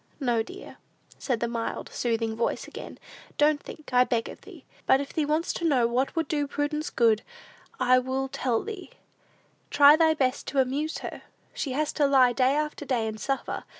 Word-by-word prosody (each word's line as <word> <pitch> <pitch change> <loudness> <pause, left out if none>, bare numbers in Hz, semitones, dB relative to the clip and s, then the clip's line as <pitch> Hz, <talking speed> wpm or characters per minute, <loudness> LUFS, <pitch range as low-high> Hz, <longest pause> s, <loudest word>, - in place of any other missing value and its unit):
"No, 240 -5 +1
dear," 220 - -10 0.4
said 245 -5 -2
the 235 - +1
mild, 230 -1 -4
soothing 225 -2 -1
voice 230 - -2
again; - - -9 0.4
"don't 295 0 +3
think, 310 - -11
I 250 0 +6
beg 235 -2 -1
of - - -11
thee; - - -14 0.2
but 265 - +5
if 280 - -6
thee 310 - 0
wants 310 +3 0
to - - -6
know 270 -8 +3
what 250 +6 0
would 325 -2 0
do 290 -1 -1
Prudence 290 +2 -2
good, 225 -3 +3 0.6
I 255 0 +4
will 260 +1 -2
tell 250 -3 -1
thee: 410 -3 -7 0.8
try 290 +1 +7
thy 320 0 +3
best 260 -2 -1
to 275 - 0
amuse 280 +5 0
her. - - -7 0.3
She 305 - -3
has 300 +2 -1
to 290 -2 +2
lie 260 -3 +5
day 260 +2 +2
after 300 0 -2
day 250 -5 -1
and 220 0 -5
suffer. 270 +3 -3
270 Hz, 190 wpm, -26 LUFS, 245-300 Hz, 0.8 s, try